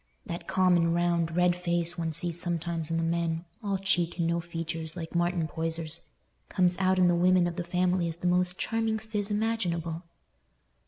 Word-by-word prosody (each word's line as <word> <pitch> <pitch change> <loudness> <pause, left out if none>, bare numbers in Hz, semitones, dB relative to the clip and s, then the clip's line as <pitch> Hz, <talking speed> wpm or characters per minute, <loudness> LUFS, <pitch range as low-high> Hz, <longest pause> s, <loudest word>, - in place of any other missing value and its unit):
That 170 0 -6
common, 175 -3 +3
round, 170 -1 +1
red 180 0 +3
face 175 -1 0
one 165 -2 -2
sees 170 +2 -1
sometimes 170 -2 -2
in 165 - 0
the 165 - 0
men—all 170 +4 -2
cheek 180 -3 0
and 170 - 0
no 170 +1 +1
features, 165 -1 -4
like 165 -2 -6
Martin 175 -1 +1
Poyser's—comes 165 +3 -2
out 190 0 +3
in 180 -1 +5
the 175 - +4
women 180 +1 +4
of 175 -1 -2
the 175 - -3
family 180 0 +1
as 165 0 -4
the 180 - -8
most 180 0 +2
charming 225 -1 0
phiz 215 -2 -2
imaginable." 180 -7 -1
175 Hz, 170 wpm, -28 LUFS, 165-180 Hz, -, in